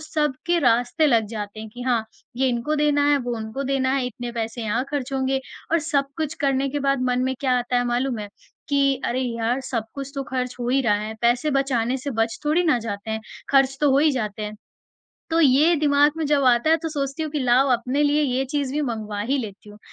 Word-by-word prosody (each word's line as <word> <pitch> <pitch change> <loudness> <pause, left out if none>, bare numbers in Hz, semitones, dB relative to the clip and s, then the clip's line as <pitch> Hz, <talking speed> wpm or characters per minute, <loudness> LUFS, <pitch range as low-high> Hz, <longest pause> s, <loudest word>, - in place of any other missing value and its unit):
सबके 310 +1 -1
रास्ते 245 +4 +3
लग 230 -5 +3
जाते 210 +1 -6
हैं 220 - -7
कि 245 - -7
हाँ, 240 -3 +1 0.3
ये 260 0 +2
इनको 245 +5 -1
देना 290 -1 +2
है 285 - +4
वो 245 -2 -3
उनको 220 +5 -5
देना 265 -1 +1
है 265 -2 0
इतने 245 -1 -6
पैसे 230 0 -4
यहाँ 230 +4 0
ख़र्च 275 -2 -3
होंगे 265 0 0 0.3
और 335 - +5
सब 290 -3 0
कुछ 315 -1 -2
करने 275 0 +1
के 290 - -2
बाद 275 -1 +2
मन 250 - +1
में 260 0 0
क्या 255 -2 +2
आता 245 +1 -1
है 245 - +2
मालूम 245 0 0
है? 205 -1 -6 0.4
कि 275 -2 +2
अरे! 250 +2 0
यार 240 0 -1
सब 235 -4 -2
कुछ 275 -1 -6
तो 275 - -2
ख़र्च 250 -1 -2
हो 240 - -2
ही 270 +2 +3
रहा 220 -4 +3
है, 220 +1 -5
पैसे 240 +5 +2
बचाने 265 -3 +1
से 275 +2 -5
बच 225 0 0
थोड़ी 310 +4 +2
ना 260 -7 +3
जाते 220 -1 -5
हैं 220 - -2 0.3
ख़र्च 270 -1 +4
तो 290 -2 +4
हो 270 - +4
ही 305 +1 +4
जाते 215 -4 -3
हैं। 210 0 -5 0.8
तो 330 +1 +3
ये 300 +4 +5
दिमाग 290 0 +4
में 320 - -1
जब 285 -1 +2
आता 250 +4 +4
है 325 - +6
तो 325 - -1
सोचती 285 0 -3
हूँ 310 - -3
कि 300 - -1
लाओ 255 +2 +3
अपने 250 +5 0
लिए 295 +1 +3
ये 265 -1 0
चीज़ 285 -3 -1
भी 300 - 0
मँगवा 215 -5 -3
ही 260 +7 0
लेती 210 -3 -7
हूँ, 210 - -14
260 Hz, 240 wpm, -23 LUFS, 235-285 Hz, 0.8 s, है